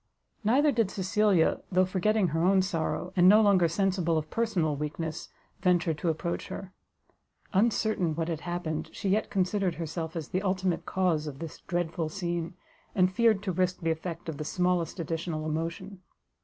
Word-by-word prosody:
Neither 275 +8 +4
did 230 -6 +1
Cecilia, 195 -2 +2
though 185 0 +4
forgetting 190 +1 +1
her 160 +2 0
own 190 +1 +4
sorrow, 180 0 -2
and 180 0 +6
no 210 +2 +8
longer 200 -5 +5
sensible 180 -1 +1
of 155 0 -3
personal 185 -10 0
weakness, 150 +2 -4 0.3
venture 175 -3 +2
to 155 +3 -2
approach 170 +2 -2
her: 190 -1 -7 0.8
uncertain 205 -5 +2
what 165 0 -2
had 165 -3 -2
happened, 175 -3 -3
she 200 - -3
yet 210 +3 +1
considered 190 -2 0
herself 160 0 -4
as 160 -3 -4
the 185 - -1
ultimate 185 -2 -1
cause 170 -5 +1
of 140 -2 -6
this 165 0 -7
dreadful 170 -2 -1
scene, 170 -1 -3 0.4
and 185 -1 +3
feared 220 -2 +3
to 195 - -1
risk 185 +1 0
the 165 -1 +1
effect 165 +1 -5
of 160 -3 -4
the 150 - -4
smallest 180 +2 0
additional 165 -1 -3
emotion. 165 +5 -4
180 Hz, 170 wpm, -28 LUFS, 165-195 Hz, 0.8 s, no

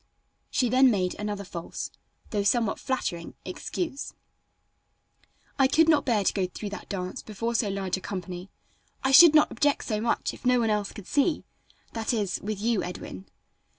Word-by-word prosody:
She 250 - +1
then 260 +2 +5
made 185 -5 +1
another 205 -1 -3
false, 170 -3 -6 0.4
though 210 - 0
somewhat 215 +1 +1
flattering, 180 -11 -3
excuse: 280 - -4 1.4
"I 270 - +6
could 320 +4 +4
not 305 -3 +4
bear 220 -5 +2
to - - +2
go 190 -2 0
through 200 +3 -7
that 205 - -8
dance 185 +3 -4
before 230 +2 -4
so 220 -3 +1
large 195 -1 -2
a - - -9
company. 180 -1 -6 0.5
I 265 - +2
should 310 +3 +9
not 305 - +5
object 290 -1 +1
so 215 -2 -1
much 230 - 0
if - - -13
no 250 -1 +4
one 225 -2 +1
else 210 -1 -1
could 205 - -10
see 295 +3 +1 0.5
that 225 +1 -1
is, 205 -4 -1
with 210 -1 -4
you 225 -1 +1
Edwin." 100 - -7
215 Hz, 175 wpm, -27 LUFS, 195-255 Hz, 1.4 s, should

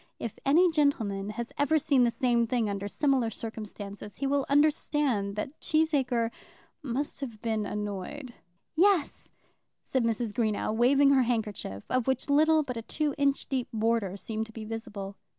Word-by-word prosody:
If 230 - -6
any 340 +5 +5
gentleman 225 -10 +1
has 235 +2 -5
ever 300 +2 +3
seen 270 -4 +3
the - - +3
same 235 -1 +1
thing 240 -2 0
under 200 0 -3
similar 265 0 +1
circumstances, 210 -2 -7
he 275 - -3
will 280 0 +1
understand 285 -8 +2
that 265 +8 -5
Cheesacre 270 -7 +1 0.5
must 280 +2 -3
have 235 -6 -6
been 220 -3 -1
annoyed. 210 +6 -5 0.4
"Yes," 360 -2 +2 0.5
said 260 -2 0
Mrs. 230 -1 -1
Greenow, 215 -2 0
waving 275 +4 +5
her 270 -2 +5
handkerchief, 215 - -2
of 255 -1 0
which 265 +2 0
little 310 +2 +5
but 250 -4 -5
a - - -3
two 295 +5 -1
inch 280 -1 +2
deep 260 -3 -2
border 220 -4 0
seemed 220 +2 -4
to - - -13
be 220 -1 -7
visible. 205 -3 -6
240 Hz, 160 wpm, -29 LUFS, 215-280 Hz, 0.5 s, any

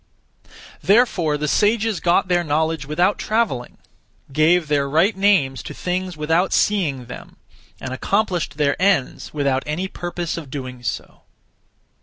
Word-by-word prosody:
Therefore 195 -9 +3
the 150 +1 -2
sages 215 +4 +2
got 175 +1 +2
their 175 -1 +2
knowledge 160 -1 -1
without 175 +7 +1
travelling; 215 - -1 0.6
gave 160 +3 +3
their 140 -2 +1
(right) 170 +9 +3
names 190 -10 +2
to - - -8
things 180 -1 -3
without 160 +5 +1
seeing 155 -12 +1
them; 125 - -11 0.4
and 130 - -5
accomplished 175 -1 -1
their 145 -2 +2
ends 190 -9 +1
without 140 -3 0
any 165 +5 -2
purpose 175 -2 -4
of 155 -5 -7
doing 130 -2 -7
so. 115 -3 -5
165 Hz, 135 wpm, -21 LUFS, 145-190 Hz, 0.6 s, Therefore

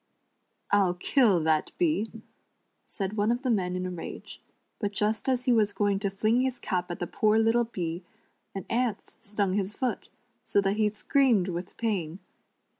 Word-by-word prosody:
"I'll 195 -3 +3
kill 205 - +3
that 155 -1 +1
bee," 310 - +1 0.8
said 195 0 -3
one 210 +1 +1
of 245 +2 -1
the 255 - +1
men 180 -4 0
in 185 0 -2
a 185 - -3
rage; 175 - -8 0.4
but 205 -2 -2
just 215 +5 0
as 250 -1 +1
he 255 - +3
was 215 -3 +3
going 205 -1 +1
to 200 -1 -1
fling 215 +5 +1
his 260 -1 -1
cap 180 -3 -2
at 175 - -4
the 175 - -3
poor 215 +5 +2
little 225 +2 +3
bee, 175 -6 -4 0.5
an 195 - -5
ant 235 -2 0 0.3
stung 200 -2 -1
his 200 +1 -1
foot, 255 +2 -2 0.3
so - - +1
that 200 +1 +1
he 215 -1 +3
screamed 215 -2 +2
with 175 +1 -5
pain. 185 -8 -2
205 Hz, 180 wpm, -28 LUFS, 185-230 Hz, 0.8 s, I'll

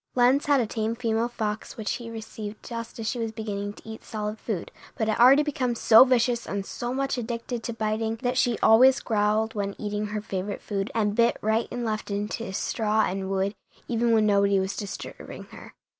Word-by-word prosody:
Lenz 255 +4 +4
had 285 -2 +4
a 240 - +2
tame 220 +1 -2
female 230 -1 0
fox 220 -2 -4
which 220 -2 -2
he 235 -1 -8
received 220 -1 -8
just 230 -1 -6
as 225 -2 -4
she 240 - -2
was 225 -1 -2
beginning 205 -2 -4
to - - -16
eat 220 0 -8
solid 210 0 -4
food, 205 -7 -4 0.3
but 220 - 0
had 220 - 0
already 265 +5 +7
become 260 -5 -1
so 225 0 +8
vicious 245 -2 +1
and 200 0 -3
so 240 +4 -4
much 270 0 -1
addicted 235 0 -4
to 235 - -4
biting 220 0 -1
that 245 0 0
she 245 -3 +2
always 255 +4 +7
growled 215 0 +1
when 200 -1 -3
eating 210 0 -3
her 210 +1 -3
favorite 200 -1 -4
food 195 -1 -2
and 210 -2 +1
bit 235 +2 +3
right 220 +2 +1
and 245 -1 -4
left 215 -1 -3
into 205 +1 -3
straw 215 +2 0
and 190 +1 -3
wood, 195 +1 0 0.3
even 235 -1 +1
when 220 -1 +4
nobody 200 -1 +3
was 190 +1 -2
disturbing 200 -2 -7
her. - - -12
220 Hz, 205 wpm, -26 LUFS, 210-235 Hz, 0.3 s, so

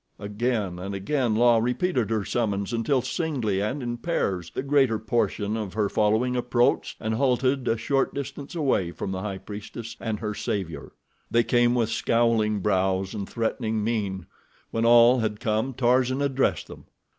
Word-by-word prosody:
Again 105 -3 -2
and 100 +2 -5
again, 120 +3 0
La 120 0 +5
repeated 125 - 0
her 110 -3 -1
summons 105 -2 -1
until 120 +3 +1
singly 130 - -1
and 130 +7 -2
in 120 0 -3
pairs 95 - -2
the - - -4
greater 135 -5 +3
portion 110 -1 -1
of 105 -4 -4
her 105 -2 +1
following 110 +4 +1
approached 120 0 +1
and 110 0 -2
halted 130 +1 +1
a 115 - +2
short 135 +4 0
distance 140 +2 -6
away 135 - +1
from 95 - -5
the 95 -1 -3
High 100 -2 -4
Priestess 105 +3 -8
and 110 -2 -3
her 105 -1 -3
savior. 95 -5 -4 0.4
They 120 0 +3
came 120 0 +3
with 115 -2 +1
scowling 115 -3 +1
brows 95 -1 0
and 100 -3 -5
threatening 110 -1 -1
mien. 100 -5 -2 0.5
When 115 0 0
all 120 +2 +7
had 105 -2 -2
come 110 +4 0
Tarzan 130 +2 +2
addressed 135 -1 0
them. - - -12
115 Hz, 165 wpm, -25 LUFS, 105-125 Hz, 0.5 s, all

